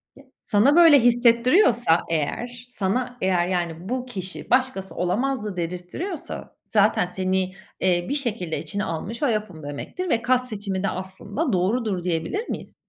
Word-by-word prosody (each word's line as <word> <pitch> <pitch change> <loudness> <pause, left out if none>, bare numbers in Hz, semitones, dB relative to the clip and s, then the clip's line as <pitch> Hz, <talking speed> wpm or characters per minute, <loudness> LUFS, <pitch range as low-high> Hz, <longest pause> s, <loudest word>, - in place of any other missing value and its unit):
Ya, 275 - -16 0.2
sana 220 +8 +4
böyle 330 -4 +8
hissettiriyorsa 240 - +4
eğer 235 +11 -3
sana 245 +3 -2
eğer 180 -2 +2
yani 175 0 -3
bu 255 0 -2
kişi 190 -7 -6
"Başkası 255 -7 +1
olamazdı!" 210 +4 -1
dedirttiriyorsa 180 - -5
zaten 210 -3 +3
seni, 185 +1 -1 0.3
iii, 175 +1 +1
bir - - 0
şekilde 220 - -2
içine 205 0 -3
almış 200 - -4
o - - +4
yapım 210 - -2
demektir 145 - -5
ve 230 - +2
cast 255 0 +2
seçimi 200 -3 -3
de 200 - +1
aslında 200 - -3
doğrudur 195 0 0
diyebilir 180 - -2
miyiz? - - -6
205 Hz, 145 wpm, -24 LUFS, 180-250 Hz, 0.3 s, böyle